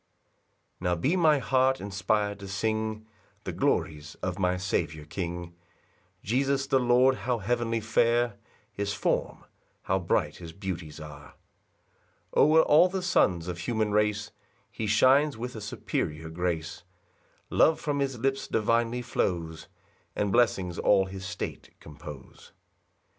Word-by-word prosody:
1 - - -13
Now 90 - +2
be 135 - +1
my 160 -4 +4
heart 130 0 +2
inspir'd 100 +1 -1
to 100 - -8
sing 110 +2 -2 0.4
The - - -4
glories 75 0 -1
of 90 +1 -2
my 90 -1 +1
Saviour 80 -4 -2
king, 85 +1 -5 0.7
Jesus 135 +4 +1
the 135 -1 +2
Lord; 125 +2 +4
how 125 -1 -1
heavenly 115 +1 -1
fair 115 +2 +2 0.4
His 100 0 -3
form! 100 - -1 0.4
how 95 0 +1
'bright 85 - 0
his 85 -2 -9
beauties 85 -5 -6
are! 75 -2 -11 1.0
2 - - +1
O'er 155 +2 +6
all 160 +5 +6
the 190 0 -3
sons 90 - +2
of 90 -1 -4
human 110 +1 -1
race 105 0 +1 0.4
He 110 - -4
shines 130 +6 +4
with 125 +2 -5
a 110 - -6
superior 80 -6 -3
grace, 85 -2 -3 0.7
Love 160 - +4
from 145 -2 -2
his 135 -2 -1
lips 135 +3 -1
divinely 115 +2 +1
flows, 85 -8 -2 0.5
And 105 -1 0
blessings 95 -7 +1
all 95 -2 +4
his 95 0 -7
state - - -7
compose. 75 -3 -12
105 Hz, 135 wpm, -28 LUFS, 90-125 Hz, 1.0 s, O'er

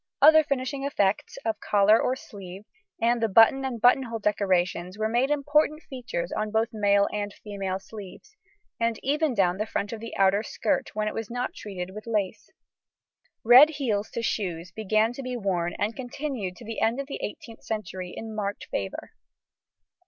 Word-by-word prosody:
Other 315 0 +8
finishing 275 -1 -2
effects 205 -8 0
of 220 -2 -1
collar 210 +1 +4
or 255 - +1
sleeve, 195 -4 -10 0.3
and 235 +1 +2
the 225 - +3
button 225 +6 +6
and 255 -3 -3
buttonhole 245 0 +3
decorations 185 -3 0
were 215 0 0
made 240 +4 +1
important 295 +2 +1
features 235 -10 -5
on 215 0 -2
both 220 +1 +1
male 200 -1 +3
and 205 -1 -2
female 195 -3 -4
sleeves, 205 - -11 0.4
and 230 -1 0
even 295 0 +1
down 185 -3 +2
the 215 +2 -2
front 205 0 -3
of 225 - -5
the 230 +1 -7
outer 195 +1 +4
skirt 220 0 -1
when 215 0 -1
it - - -2
was 225 -2 -5
not 245 +1 -3
treated 190 -3 -7
with 215 +2 -9
lace. 210 -2 -2 0.9
Red 250 +6 +9
heels 230 -9 -2
to 235 - -2
shoes 175 -6 -2
began 215 +3 +1
to 275 - -7
be 255 -1 -4
worn 180 -5 -1
and 215 +2 -1
continued 250 -7 -4
to 240 - -12
the 225 0 -5
end 230 +4 +2
of 275 - -3
the 275 - -6
18th 230 -1 -7
century 190 -4 -4
in 220 -1 -6
marked 205 -1 -3
favour. 95 -1 -4
220 Hz, 175 wpm, -26 LUFS, 200-245 Hz, 0.9 s, Red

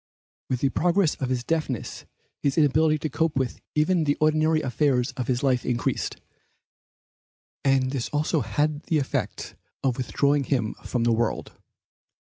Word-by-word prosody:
With 125 -1 -1
the 135 - +3
progress 175 +2 +2
of 130 - -1
his 125 -2 -1
deafness 155 -6 -3 0.4
his 140 +1 0
inability 155 +1 +4
to 155 - -3
cope 160 +2 0
with 130 -2 -2
even 155 +2 +2
the 145 0 +2
ordinary 155 +1 +2
affairs 130 0 +1
of 125 -3 -5
life 130 -3 +2
increased, 120 -2 -1 1.4
and 135 -1 +2
this 135 -4 -2
also 150 +2 +1
had 145 +7 0
the 160 - +1
effect 140 -2 -3 0.3
of 130 -3 +1
withdrawing 140 +2 +1
him 120 -6 0
from 120 -2 -1
the 120 0 +3
world. 115 0 -1
140 Hz, 145 wpm, -25 LUFS, 125-155 Hz, 1.4 s, inability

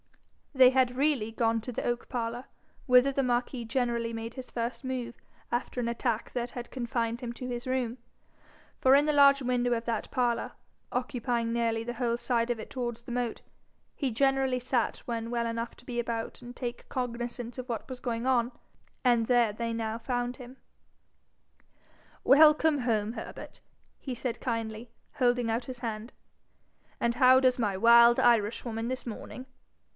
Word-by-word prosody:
They 260 -2 +7
had 255 -1 +2
really 270 -6 +1
gone 225 0 +1
to 250 - -6
the 230 - -4
oak 240 0 -2
parlour, 240 0 -3 0.4
whither 250 +2 +6
the 275 0 0
marquis 245 0 -1
generally 235 -1 -1
made 225 0 -5
his 260 -1 -8
first 235 +3 -3
move 250 -2 -4 0.4
after 245 +1 -2
an 235 - -1
attack 235 -1 -2
that 240 -1 -3
had 240 -1 -7
confined 235 -2 -2
him 240 -2 -4
to 250 +1 -7
his 245 +1 -5
room; 255 -1 -1 0.8
for 265 +1 +6
in 285 +1 +5
the 300 - +2
large 280 -1 +6
window 245 -1 0
of 230 0 -2
that 230 -3 -2
parlour, 240 -2 0 0.4
occupying 240 -2 -1
nearly 230 -1 0
the 240 +1 -4
whole 235 -1 -1
side 240 -1 0
of 240 -2 -1
it - - -8
towards 240 -2 -4
the 240 - -8
moat, 245 -2 -2 0.5
he 270 -4 -1
generally 270 +1 +2
sat 245 -1 0
when 230 -1 -3
well 235 -1 -1
enough 230 0 -3
to - - -17
be 240 -1 -3
about 230 -1 -4
and 245 0 -10
take 240 -2 -6
cognizance 240 -1 -4
of 255 0 -6
what 230 - -4
wa's 255 -1 -8
going 235 -1 -2
on; 250 -2 +2 0.5
and 235 -2 +3
there 240 -4 +3
they 230 +2 -3
now 225 -1 -2
found 245 0 -2
him. 250 0 -11 1.7
'Welcome 300 +1 +6
home, 225 -3 0
Herbert!' - - -9 0.4
he 260 -3 -5
said, 240 -1 -4
kindly, 230 -1 -3 0.3
holding 245 -2 +2
out 230 +2 -1
his 255 -1 -7
hand. 225 -1 -5 0.9
'And 235 0 +1
how 255 0 +6
does 255 -1 +2
my 205 -4 0
wild 235 +2 +7
Irishwoman 225 0 +1
this 255 0 -4
morning? 250 +2 -7
240 Hz, 170 wpm, -29 LUFS, 230-255 Hz, 1.7 s, They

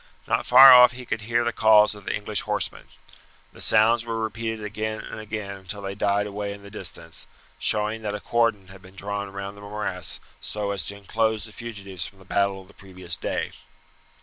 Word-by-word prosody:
Not - - 0
far 130 +1 +10
off 125 -1 +8
he 125 0 -9
could 110 -2 -3
hear 120 +2 +1
the 120 0 -1
calls 110 -1 +5
of 105 -2 -13
the - - -1
English 105 0 -2
horsemen. - - -2 0.7
The - - -12
sounds 115 +2 +4
were 115 -1 -3
repeated 110 0 -3
again 110 +1 -4
and - - -8
again 105 -2 -5
until 95 +2 -7
they 100 0 -4
died 100 +1 +1
away 100 0 -4
in 100 0 -12
the 100 - -12
distance, 85 -5 -4 0.3
showing 105 +1 +1
that 105 -1 -3
a - - -4
cordon 115 -4 0
had 95 0 -13
been 95 +1 -16
drawn 100 0 -4
round 100 +1 -6
the 100 - -13
morass 100 -4 -3 0.2
so 105 -1 -3
as 100 - -1
to 100 - -4
inclose 110 +1 0
the 110 - -9
fugitives 100 -6 -6
from 100 - -16
the 95 - -17
battle 100 0 0
of - - -21
the 100 - -18
previous 95 -4 -5
day. - - -3
105 Hz, 205 wpm, -25 LUFS, 100-110 Hz, 0.7 s, far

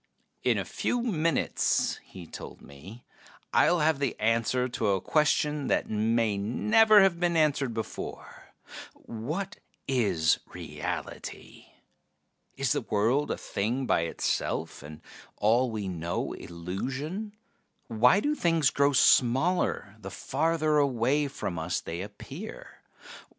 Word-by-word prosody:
"In - - +2
a - - -2
few 245 -1 -2
minutes," 165 - 0
he 90 -3 -11
told - - -9
me, 85 - -12 0.5
"I'll 175 -2 +4
have 155 -2 +2
the 140 - -2
answer 115 +3 +1
to 125 -3 -2
a 100 -1 +2
question 150 - +1
that - - 0
may 110 -1 +1
never 215 - +5
have 180 -3 +2
been 175 -1 +1
answered 145 -5 +2
before: 110 - -7 0.4
what 155 - -5 0.3
is 100 -12 +2
reality? - - -7 0.9
Is - - 0
the - - +1
world 115 +8 +1
a - - -2
thing 120 +7 -2
by 85 - +2
itself, 80 - -2
and 75 +2 -11 0.4
all 120 +4 +3
we 105 -3 -4
know 85 -2 -3
illusion? 130 - -5 0.5
Why 125 - +4
do 295 +5 +1
things 165 - +2
grow 140 0 +2
smaller 130 - +3
the 100 -2 -8
farther 155 - 0
away 140 +1 +1
from 90 -10 -4
us 80 +3 -2
they 85 +2 -6
appear? 145 - -9
130 Hz, 125 wpm, -28 LUFS, 105-155 Hz, 0.9 s, never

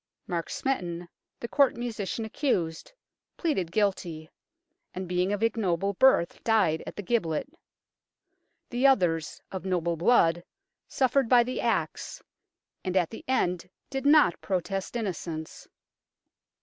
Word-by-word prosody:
Mark 170 -3 -3
Smeton, 175 -10 -2 0.3
the 235 - -3
Court 275 0 +3
musician 225 -2 -3
accused, 190 - -1 0.5
pleaded 195 - -1
guilty, 175 -6 -1 0.6
and 185 0 -4
being 180 +2 0
of 205 +1 -1
ignoble 200 -4 +1
birth 230 -6 +3
died 210 -9 +2
at - - -7
the 205 - -6
gibbet. 175 - 0 1.2
The 250 +3 +3
others, 175 - +2
of 190 - -5
noble 175 -3 0
blood, 170 -3 +3 0.4
suffered 260 -2 +1
by 245 -2 +6
the 255 +2 -3
axe, - - -1 0.6
and 185 -1 -1
at 175 -3 +1
the 225 - -9
end 180 -8 0 0.2
did 270 +1 -1
not 290 - +5
protest 195 +2 -2
innocence. 170 -7 -5
195 Hz, 125 wpm, -28 LUFS, 170-240 Hz, 1.2 s, by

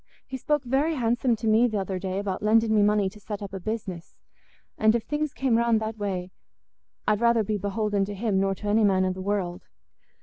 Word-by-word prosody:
He 265 - -7
spoke 295 +2 0
very 275 +6 +1
handsome 240 -1 +1
to 225 +1 -4
me 225 +3 +4
th' 220 - -4
other 190 -2 -2
day 190 0 -3
about 195 -2 -3
lending 220 +1 +3
me 210 - +4
money 205 -1 +3
to 210 +3 -9
set 205 0 -6
up 195 - -8
i' 195 - -4
business; 190 -4 -5 0.6
and 220 +1 +3
if 235 - -1
things 300 0 -2
came 260 -4 +1
round 235 -1 +3
that 220 0 -5
way, 185 -3 -3 0.8
I'd 210 +1 +2
rather 235 -1 +4
be 210 0 -2
beholding 205 0 0
to 205 +1 -6
him 200 -1 0
nor 195 0 +1
to 210 - -7
any 215 +2 +3
man 190 -2 +3
i' 185 - 0
the 185 0 -6
world." 190 -3 -2
210 Hz, 225 wpm, -26 LUFS, 195-230 Hz, 0.8 s, me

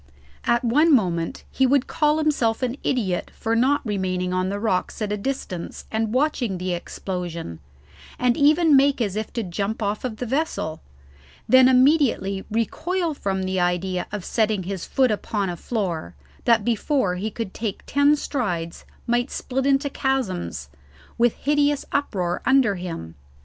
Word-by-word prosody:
At 235 +1 +2
one 295 +8 +4
moment 175 - +1
he 265 - +2
would 270 0 +3
call 300 0 +1
himself 270 -7 +1
an 250 0 0
idiot 205 -9 -1
for 225 +1 -1
not 260 +5 +2
remaining 185 -3 -1
on 185 0 0
the 200 +1 -3
rocks 205 -4 -1
at 210 -2 -2
a - - +1
distance 200 -6 -5
and 220 0 0
watching 255 -6 0
the 180 0 -2
explosion, 175 - -5 0.6
and 245 -1 +2
even 305 +1 +5
make 275 0 +4
as 205 -5 -1
if 215 0 -3
to 230 - -2
jump 200 +4 -3
off 205 +1 -1
the 250 -1 -4
vessel, 245 - -2 0.7
then 260 0 +7
immediately 255 -8 +3
recoil 320 - -1
from 195 -8 -2
the 185 0 -1
idea 180 +1 0
of 205 -3 -5
setting 215 -4 +1
his 190 -1 -4
foot 260 -3 +2
upon 205 -2 -1
a - - -5
floor 170 - -3 0.3
that 230 -3 +4
before 240 -2 +1
he 210 +4 -2
could 220 -2 -5
take 215 -3 -4
ten 285 +2 +4
strides 180 - -3 0.2
might 240 +2 +1
split 265 +1 -2
into 275 +1 +3
chasms, 185 - -2 0.5
with 235 -1 +3
hideous 290 0 +1
uproar 180 -11 -1
under 265 -5 +4
him. 170 - -6
220 Hz, 155 wpm, -23 LUFS, 185-270 Hz, 0.7 s, then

